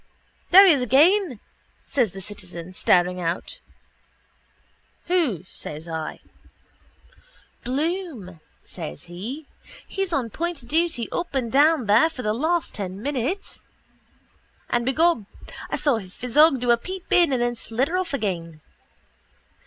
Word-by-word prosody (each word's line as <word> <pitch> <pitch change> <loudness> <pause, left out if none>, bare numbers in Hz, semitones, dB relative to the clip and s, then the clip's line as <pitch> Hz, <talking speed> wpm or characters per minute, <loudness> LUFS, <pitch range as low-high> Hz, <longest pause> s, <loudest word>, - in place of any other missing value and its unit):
—There 385 +3 +9
he 365 - +7
is 275 - 0
again, 295 - +3 0.5
says 240 -8 +1
the 195 - -9
citizen, 185 -3 -9
staring 180 0 +2
out. 170 0 -3 1.5
—Who? 305 - +1
says 155 -1 -8
I. 160 -1 -5 1.4
—Bloom, 275 - -3 0.3
says 75 0 -8
he. 225 - -7 0.4
He's 390 -2 -3
on 260 -8 -1
point 330 - -4
duty 315 -5 0
up 345 -4 -3
and 240 -4 -1
down 295 -1 +4
there 220 +10 +5
for 255 -6 -8
the 215 -1 0
last 320 +8 0
ten 190 -2 -5
minutes. 290 - -3 1.1
And, 240 0 0
begob, 310 - +2 0.4
I - - -1
saw 285 -6 +2
his 190 -3 -7
physog 275 +4 +4
do 245 -1 +3
a 235 - +5
peep 370 +9 -6
in 345 -4 +5
and 260 - +1
then 240 0 0
slidder 255 +8 -2
off 370 0 -1
again. 175 - -3
250 Hz, 130 wpm, -24 LUFS, 200-325 Hz, 1.5 s, There